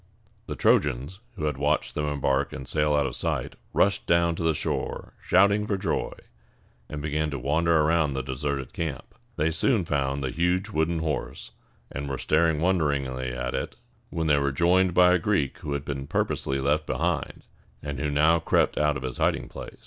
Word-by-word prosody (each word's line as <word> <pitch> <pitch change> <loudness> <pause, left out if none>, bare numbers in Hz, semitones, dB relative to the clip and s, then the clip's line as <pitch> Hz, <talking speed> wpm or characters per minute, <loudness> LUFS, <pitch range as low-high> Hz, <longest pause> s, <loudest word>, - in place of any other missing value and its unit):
The - - -4
Trojans, 75 +6 +1 0.2
who 80 - -3
had 75 -3 -1
watched 75 +2 0
them 75 - -2
embark 70 -1 0
and 65 - -7
sail 75 -1 +1
out 70 -1 +2
of - - -3
sight, - - -2 0.2
rushed 100 +1 +1
down 85 0 +3
to 80 - -6
the 80 -1 +2
shore - - -3
shouting 100 +3 +3
for 100 - 0
joy, 95 - -2 0.8
and 75 -1 -6
began 75 0 -1
to 70 - -4
wander 80 +5 +2
around 80 -1 +2
the 65 - -2
deserted 70 0 -3
camp. 80 -5 -5 0.2
They 80 +2 +1
soon 105 - +2
found 70 -2 -1
the 65 - -2
huge 90 +4 0
wooden 80 -2 0
horse, 75 -3 -4 0.4
and 70 -1 -5
were 70 - -2
staring 80 +1 +2
wonderingly 70 -8 0
at 60 0 -3
it, - - -3 0.3
when 80 -1 -2
they 75 -2 +3
were 70 0 0
joined 90 +5 +3
by 90 0 +6
a 90 - +3
Greek 80 -7 0
who 75 - -4
had 70 -1 -4
purposely 65 - -1
been 70 - -3
left 75 +2 +1
behind, - - -2 0.4
and 70 -1 -4
who 75 - -1
now 80 +3 +4
crept - - +1
out 75 0 +2
of 65 - -8
his 65 -1 -5
hiding - - 0
place. - - -9
75 Hz, 190 wpm, -26 LUFS, 70-85 Hz, 0.8 s, by